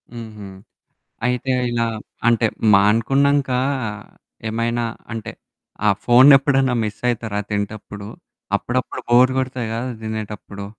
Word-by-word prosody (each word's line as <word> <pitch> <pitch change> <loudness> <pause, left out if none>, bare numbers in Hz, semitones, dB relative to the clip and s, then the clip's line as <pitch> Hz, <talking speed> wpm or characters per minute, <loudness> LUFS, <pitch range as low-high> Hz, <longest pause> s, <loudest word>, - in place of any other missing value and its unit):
హుహు. 110 -3 -9 0.8
అయితే 125 +1 0 0.2
ఇలా 115 -1 0 0.4
అంటే 115 -1 +3 0.3
మానుకున్నంకా 130 +6 +3 0.9
ఏమైనా 115 +1 -1 0.3
అంటే, 115 -2 -5 0.5
ఆ - - +5 0.2
ఫోన్ 125 +3 +7
ఎప్పుడన్నా 135 -2 +1
మిస్సయితరా 110 -1 -2
తింటప్పుడు? 105 0 -4 0.5
అప్పుడప్పుడు 130 +1 -3
బోర్ 125 +2 +6
గొడతది 130 -3 -2
కదా! 115 +2 -3 0.2
దినేటప్పుడు. 105 -2 -6
115 Hz, 95 wpm, -20 LUFS, 110-125 Hz, 0.9 s, ఫోన్